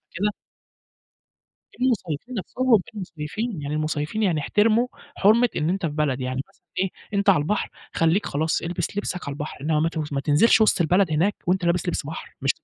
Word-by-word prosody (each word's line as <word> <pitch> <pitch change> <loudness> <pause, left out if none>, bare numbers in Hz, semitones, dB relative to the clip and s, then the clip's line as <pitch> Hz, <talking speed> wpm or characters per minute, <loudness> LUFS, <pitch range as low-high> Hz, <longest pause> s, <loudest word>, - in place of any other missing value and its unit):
كده. 205 +4 0 1.5
المُصيّفين 240 - -1
نَفسهم، 240 +2 +2
المُصيّفين، 180 +1 -4
يعني 145 +1 -3
المُصيّفين 155 +6 -1
يعني 170 -7 +2
احتِرموا 220 - +3 0.3
حُرمة 230 +5 +5
إن 155 - 0
أنت 190 -1 -1
في 150 - -3
بلد 145 -4 0
يعني 130 +1 -2
مثلًا - - -29 0.2
إيه، 190 0 +1 0.3
أنت 200 0 0
على 190 - +4
البحر 210 +7 -1 0.3
خلّيك 165 +5 +2
خلاص 160 +3 0
إلبس 175 +3 -3
لِبسك 180 -6 -3
على - - -3
البحر، 145 -1 -6
إنما 150 +1 +1
ما 160 - +2
ت 155 -3 -4
ما 140 - 0
تنزِلش 170 +11 +4
وِسط 215 - +4
البلد 175 +2 +3
هناك 185 +7 +2
وأنت 180 0 +1
لابس 175 +1 +1
لِبس 160 -4 -2
بحر، 160 - -8
مش 135 - +2
175 Hz, 180 wpm, -24 LUFS, 150-205 Hz, 1.5 s, حُرمة